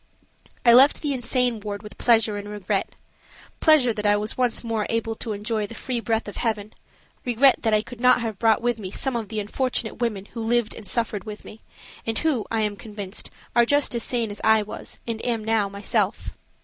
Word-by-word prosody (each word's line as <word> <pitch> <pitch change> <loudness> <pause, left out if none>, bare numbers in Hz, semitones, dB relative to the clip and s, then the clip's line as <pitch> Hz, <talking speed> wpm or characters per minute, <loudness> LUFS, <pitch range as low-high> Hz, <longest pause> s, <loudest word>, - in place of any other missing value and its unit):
I 235 - +8
left 270 +6 +6
the 290 -2 0
insane 250 -2 +1
ward 205 -1 -6
with 210 - -11
pleasure 225 -3 +4
and 205 0 -6
regret–pleasure 220 - 0
that 210 -1 -5
I 205 0 +4
was 210 +1 -2
once 250 -2 0
more 225 -2 -1
able 225 0 -1
to 230 - -4
enjoy 210 +1 -2
the 230 - -10
free 250 0 -2
breath 225 -1 -1
of 205 - -7
heaven; 215 -2 -2 0.5
regret 250 +2 +4
that 225 -2 +1
I 210 - +2
could 240 0 -11
not 250 0 +5
have 220 -4 -4
brought 225 -1 +3
with 240 -1 0
me 190 -3 -5
some 265 +6 -1
of 225 -3 -3
the 220 -1 -3
unfortunate 230 +2 -2
women 210 -5 -1
who 230 - -5
lived 230 0 +1
and 215 - -10
suffered 220 -5 -1
with 215 -1 -8
me, 220 - -12 0.4
and 225 -1 -2
who, 280 -9 0
I 225 -1 0
am 210 -1 -1
convinced, 205 -2 -7 0.3
are 240 - +6
just 285 +2 +2
as 235 - 0
sane 230 -2 0
as 205 - -8
I 220 -1 +5
was 210 - -8
and 225 -1 -4
am 230 -3 -1
now 220 -3 +1
myself. 200 +1 -1
225 Hz, 210 wpm, -24 LUFS, 210-240 Hz, 0.5 s, I